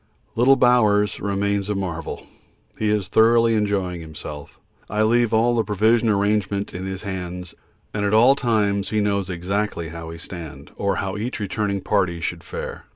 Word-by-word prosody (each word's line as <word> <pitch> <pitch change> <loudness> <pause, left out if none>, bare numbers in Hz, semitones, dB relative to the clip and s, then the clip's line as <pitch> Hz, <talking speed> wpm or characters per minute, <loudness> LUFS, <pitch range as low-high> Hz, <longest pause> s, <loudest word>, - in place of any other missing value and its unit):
Little 125 +4 +5
Bowers 110 -5 +3
remains 100 0 -1
a 105 - 0
marvel 85 -5 -4 0.5
he 110 - +1
is 105 -3 0
thoroughly 115 +2 +4
enjoying 100 -5 -1
himself. 75 -2 -9 0.3
I 105 +1 +1
leave 120 +1 +3
all 115 +2 +3
the 115 - +2
provision 110 +3 +2
arrangement 100 -1 0
in 95 +2 -5
his 95 +1 -5
hands, 90 -3 -5 0.4
and 105 - -2
at 100 - +1
all 115 +5 +6
times 105 -6 0
he 110 - 0
knows 100 -2 0
exactly 90 -1 -2
how 85 0 -8
we 80 0 -7
stand, 80 -5 -8
or 100 -1 0
how 95 +1 -3
each 115 +4 -4
returning 100 -1 -2
party 90 -5 0
should 85 0 -4
fare. - - -7
100 Hz, 165 wpm, -22 LUFS, 90-110 Hz, 0.5 s, all